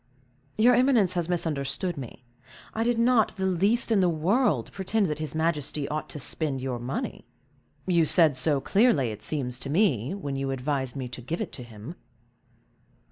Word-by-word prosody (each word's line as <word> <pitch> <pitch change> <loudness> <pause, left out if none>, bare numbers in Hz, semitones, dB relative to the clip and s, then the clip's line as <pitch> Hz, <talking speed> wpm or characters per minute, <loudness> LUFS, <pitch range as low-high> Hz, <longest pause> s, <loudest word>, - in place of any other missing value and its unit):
"Your 240 +3 +5
eminence 245 -7 +3
has 175 -1 -2
misunderstood 160 0 -1
me. 125 -2 -9 0.5
I 225 - -1
did 240 0 +1
not, 235 -1 +3
the 190 - -1
least 200 +6 +1
in 215 - +4
the 180 -2 +3
world, 165 - +1
pretend 200 +2 0
that 155 -3 -3
his 155 -1 -4
majesty 150 -3 -1
ought 155 0 -4
to 150 - -7
spend 145 0 -2
your 130 -2 -3
money." 125 +3 -5 0.6
"You 170 -4 +2
said 160 -5 +5
so, 140 +2 +2
clearly, 195 - +2
it 105 - -9
seems 125 -5 -1
to 135 - -5
me, 150 - +1
when 145 -9 -5
you 135 0 -2
advised 135 -1 -2
me 130 -2 -4
to 125 +1 -8
give 160 +8 -4
it - - -4
to - - -6
him." 120 +7 -10
155 Hz, 180 wpm, -26 LUFS, 135-190 Hz, 0.6 s, Your